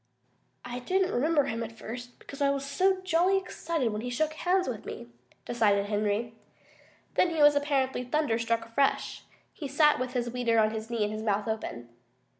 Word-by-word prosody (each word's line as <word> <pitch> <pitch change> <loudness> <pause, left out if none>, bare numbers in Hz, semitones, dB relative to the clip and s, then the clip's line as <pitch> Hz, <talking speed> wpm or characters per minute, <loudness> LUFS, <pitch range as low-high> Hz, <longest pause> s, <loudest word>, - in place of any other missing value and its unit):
"I 245 0 -5
didn't 370 +8 +1
remember 295 +4 +3
him 230 -3 -3
at 225 0 -6
first, 245 +2 -8
because 280 +1 -11
I 280 - +4
was 275 0 -1
so 375 +6 +1
jolly 370 +2 +3
excited 330 -8 -2
when 210 - -3
he 245 - -4
shook 310 +6 0
hands 365 +3 +1
with 230 -5 -4
me," 120 - -8 0.4
decided 205 -4 +2
Henry. 210 +2 -1 0.8
Then 360 - +3
he 320 -3 +2
was 295 0 +8
apparently 275 -3 0
thunderstruck 230 -4 0
afresh. 250 +5 0 0.3
He 295 - -6
sat 300 +1 +4
with 255 0 -3
his 240 -2 -1
weeder 240 -2 +1
on 215 -1 +4
his 220 0 -5
knee 230 -2 0
and 210 +1 -1
his 215 - -4
mouth 210 0 0
open. 120 - -4
245 Hz, 185 wpm, -29 LUFS, 225-300 Hz, 0.8 s, was